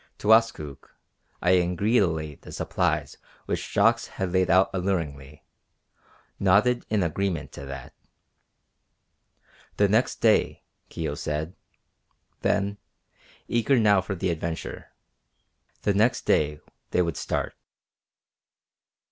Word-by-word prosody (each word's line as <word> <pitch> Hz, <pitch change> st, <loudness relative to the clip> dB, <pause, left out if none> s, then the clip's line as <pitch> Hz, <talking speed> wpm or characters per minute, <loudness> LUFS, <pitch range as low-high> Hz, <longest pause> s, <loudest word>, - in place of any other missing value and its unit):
Towaskook, 105 Hz, -11 st, +1 dB, 0.5 s
eyeing 90 Hz, 0 st, +3 dB
greedily 85 Hz, -7 st, +1 dB
the -, -, -14 dB
supplies -, -, -1 dB, 0.3 s
which -, -, -3 dB
Jacques -, -, +3 dB
had 95 Hz, -2 st, -4 dB
laid 95 Hz, 0 st, +2 dB
out 95 Hz, +1 st, +4 dB
alluringly, 75 Hz, -7 st, -3 dB, 1.0 s
nodded 105 Hz, +6 st, +3 dB
an 105 Hz, -3 st, +1 dB
agreement 85 Hz, 0 st, -2 dB
to 70 Hz, -, -9 dB
that. 70 Hz, -2 st, -8 dB, 1.8 s
"The -, -, +4 dB
next -, -, +2 dB
day," -, -, +2 dB, 0.3 s
Kio 80 Hz, -4 st, -3 dB
said, 75 Hz, +3 st, -3 dB, 0.9 s
then, 100 Hz, +1 st, 0 dB, 0.7 s
eager 120 Hz, +3 st, +2 dB
now 105 Hz, -4 st, +4 dB
for 95 Hz, +1 st, -4 dB
the 90 Hz, 0 st, -1 dB
adventure. 80 Hz, 0 st, -5 dB, 0.9 s
"The 100 Hz, -, +2 dB
next 110 Hz, +5 st, +2 dB
day 75 Hz, 0 st, +2 dB, 0.3 s
they 90 Hz, -, +2 dB
would 85 Hz, -1 st, -2 dB
start." -, -, -2 dB
90 Hz, 105 wpm, -26 LUFS, 80-100 Hz, 1.8 s, out